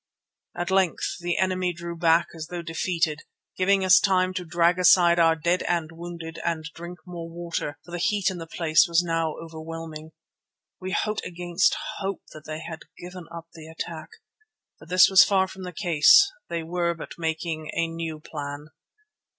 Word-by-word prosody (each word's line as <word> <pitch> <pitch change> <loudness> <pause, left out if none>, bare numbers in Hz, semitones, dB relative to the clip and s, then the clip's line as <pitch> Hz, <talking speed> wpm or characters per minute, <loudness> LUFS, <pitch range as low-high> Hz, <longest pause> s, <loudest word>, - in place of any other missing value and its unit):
At 175 +2 -2
length 190 -3 +1
the 175 0 -2
enemy 185 -1 0
drew 170 +1 -7
back 165 0 +3
as 160 -1 -7
though 175 -1 -6
defeated, 165 -2 -1 0.4
giving 190 +1 +2
us 185 0 +7
time 185 -2 +2
to 185 -1 -3
drag 170 +1 +2
aside 175 -1 +6
our 165 -1 +5
dead 170 +3 0
and 170 -2 -1
wounded 165 -1 -8
and 165 -2 -1
drink 175 +1 -9
more 170 -2 -7
water, 170 -3 -4
for 175 - -13
the 175 - -4
heat 200 +1 +1
in 180 - -7
the 165 - -7
place 165 +1 +3
was 170 +1 +3
now 165 -2 -1
overwhelming. 160 -1 -8 0.7
We 185 - -5
hoped 215 +3 -1
against 175 +1 0 0.2
hope 195 -1 -4
that 155 -1 -12
they 155 0 -6
had 160 -1 -7 0.2
given 180 -1 -9
up 170 0 -9
the 160 -1 -11
attack. 160 0 -7 0.7
But - - -15
this 185 +1 +7
was 190 -1 +8
far 190 -1 +2
from 190 0 -9
the 180 - -6
case; 210 - +5 0.2
they 170 -1 -3
were 170 +1 -1
but 165 - -10
making 160 -1 -3
a 165 - +1
new 165 -1 -5
plan. 145 -1 -7
170 Hz, 175 wpm, -25 LUFS, 165-180 Hz, 0.7 s, was